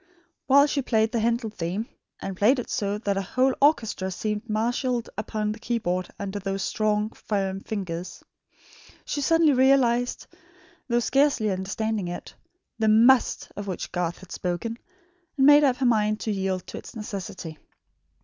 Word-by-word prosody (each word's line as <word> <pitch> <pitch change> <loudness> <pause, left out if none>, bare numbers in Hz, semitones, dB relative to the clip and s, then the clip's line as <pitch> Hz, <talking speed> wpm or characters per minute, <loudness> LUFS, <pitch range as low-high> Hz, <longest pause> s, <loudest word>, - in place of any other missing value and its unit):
While 280 +2 +7
she 290 -1 0
played 220 -3 +1
the 235 - 0
Handel 230 0 0
theme 190 +4 -3 0.3
and 195 - -5
played 220 +9 +4
it 245 - -5
so 205 0 -1
that 200 -2 -1
a - - +1
whole 255 +7 +1
orchestra 225 -10 +2
seemed 210 +4 -3
marshalled 240 +2 -1
upon 215 0 -2
the 215 - -7
key 235 +1 -1
board 180 -4 -2
under 200 0 -4
those 195 0 -3
strong, 215 0 0
firm 195 -2 -2
finger 185 -5 -4 1.0
she 290 - -2
suddenly 325 0 +4
realised, 250 -2 +3 0.6
though 240 -1 +2
scarcely 270 -5 +2
understanding 195 +1 -2
it, 175 - -7 0.5
the 220 - +2
MUST 235 +4 +4
of 205 0 -6
which 185 - -4
Garth 175 -1 -2
had 190 - -15
spoken, 185 +6 -3 0.6
and 270 - +4
made 290 +1 +8
up 265 -3 +4
her 265 - -1
mind 215 -3 +2
to 220 - -1
yield 190 -2 -2
to - - -7
its - - -12
necessity. 190 -6 -6
215 Hz, 160 wpm, -25 LUFS, 195-245 Hz, 1.0 s, made